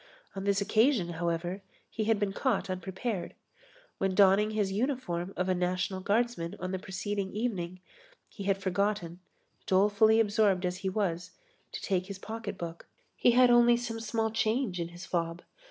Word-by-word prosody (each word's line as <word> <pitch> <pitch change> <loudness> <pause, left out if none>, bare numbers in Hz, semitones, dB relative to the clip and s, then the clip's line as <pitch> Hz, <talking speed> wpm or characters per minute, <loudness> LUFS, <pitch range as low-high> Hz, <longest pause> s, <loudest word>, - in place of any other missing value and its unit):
On 195 0 -4
this 200 0 +2
occasion, 220 -2 +3
however, 170 +2 -2 0.3
he 220 - -2
had 220 -1 +2
been 200 -1 -1
caught 195 -1 0
unprepared. 190 +2 -4 0.6
When 195 -1 0
donning 200 +2 +5
his 210 -3 0
uniform 200 -6 -2
of 180 - 0
a 185 - +3
National 180 +1 -1
Guardsman 205 -3 0
on 185 +1 -4
the 190 - -2
preceding 195 +1 -3
evening, 185 -6 -3 0.5
he 200 - -9
had 195 -1 +2
forgotten, 190 -2 -1 0.5
dolefully 205 +3 +4
absorbed 205 -4 +2
as 180 0 -2
he 190 0 -2
was, 180 -3 -2 0.4
to - - -6
take 185 -1 0
his 200 -1 -6
pocket 220 0 -6
book. 170 -1 -7 0.3
He 245 - +4
had 250 0 +6
only 240 0 +6
some 235 -1 -4
small 225 0 -1
change 220 -3 0
in 170 - -2
his 175 +2 -10
fob. 170 0 -2
195 Hz, 165 wpm, -30 LUFS, 180-220 Hz, 0.6 s, had